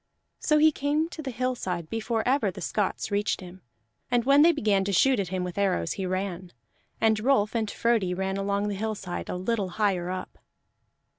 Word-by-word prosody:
So 305 - +2
he 310 +1 +6
came 295 +3 0
to 330 - -7
the 280 - -5
hillside 230 -9 -2
before 225 +3 -2
ever 255 -5 +2
the 185 - -8
Scots 205 0 -2
reached 205 +1 0
him; 185 -1 -11 0.5
and 245 -1 +2
when 280 +2 +6
they 335 +3 +7
began 210 -10 +1
to 200 - -1
shoot 260 +6 +4
at 195 - -1
him 185 0 -2
with 180 +2 -4
arrows, 190 - +1
he 190 - -3
ran. 185 -1 -3 0.5
And 220 -1 +3
Rolf 215 -3 +2
and 225 -3 -1
Frodi 215 -7 +1
ran 190 +1 -2
along 200 +1 -1
the - - -2
hillside 200 -3 -4
a - - -2
little 195 +1 -1
higher 190 -5 +1
up. 185 0 -6
205 Hz, 195 wpm, -27 LUFS, 185-240 Hz, 0.5 s, they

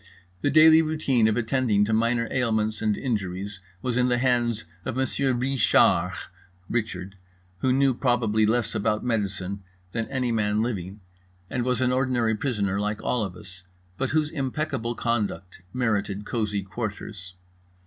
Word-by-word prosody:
The - - +2
daily 160 +2 +7
routine 150 -7 +2
of 110 - +1
attending 115 -3 +2
to 110 - -1
minor 115 +1 +2
ailments 110 -4 0
and 105 -2 +1
injuries 100 -4 -3 0.2
was 125 -1 -1
in 125 0 +3
the 125 -1 +2
hands 120 -5 +1 0.2
of - - -4
Monsieur 130 +1 +1
Ree 130 +2 -1
shar 90 -5 +4 0.6
(Richard), 100 -4 -3 0.4
who 130 - +2
knew 135 0 +3
probably 115 -4 +2
less 115 0 +1
about 105 +2 0
medicine 100 -4 -2 0.3
than 115 +1 -2
any 130 -3 -1
man 105 -1 +1
living 100 -3 -4 0.5
and 125 - -1
was 125 0 0
an 125 -1 +2
ordinary 125 -3 +1
prisoner 105 -5 -1
like 105 0 -2
all 120 -3 0
of 95 -3 -5
us, 90 -2 -12 0.4
but 135 - 0
whose 155 0 +1
impeccable 130 -4 -2
conduct 105 -7 -2
merited 105 -4 -1
cosy 105 -4 -1
quarters. 100 -2 -6
115 Hz, 150 wpm, -25 LUFS, 105-125 Hz, 0.6 s, daily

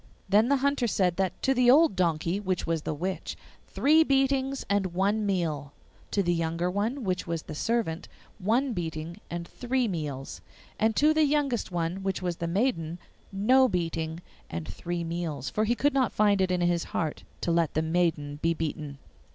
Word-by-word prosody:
Then 210 +5 +4
the 280 - +5
Hunter 280 -4 +2
said 185 -5 +1
that 185 -2 -1
to 270 - +3
the 250 -1 +4
old 305 -2 +6
donkey, 170 +1 0
which 185 -3 -2
was 165 -2 -1
the 155 - -3
witch, 185 +5 -4 0.3
three 315 +3 +4
beatings 270 -1 +1
and 195 -3 0
one 205 +3 +1
meal; 155 -7 -1 0.4
to 200 - +1
the 175 -1 +2
younger 165 +1 -1
one, 225 +8 -1
which 185 -3 -2
was 165 -1 -2
the - - -8
servant, 200 -1 -1 0.3
one 235 +7 +1
beating 165 -2 -4
and 170 0 -5
three 250 0 -1
meals; 150 -8 -5 0.4
and 220 +1 +2
to 305 +2 +4
the 310 0 +4
youngest 280 -8 0
one, 175 +2 -2
which 195 0 -1
was 175 -2 -3
the 170 - -3
maiden, 170 -4 0 0.3
no 250 +7 +4
beating 165 -2 -2 0.3
and 85 -1 -5
three 175 0 -4
meals; 165 -5 -3
for 215 - +1
he 240 +3 +1
could 290 +4 +2
not 265 -4 +2
find 205 -2 +3
it 190 - +2
in 180 -1 0
his 175 -1 +1
heart 155 -3 -3 0.2
to 170 - 0
let 165 -2 +1
the 155 - +2
maiden 160 -3 0
be 165 0 +2
beaten. 150 -3 -4
185 Hz, 185 wpm, -28 LUFS, 165-235 Hz, 0.4 s, old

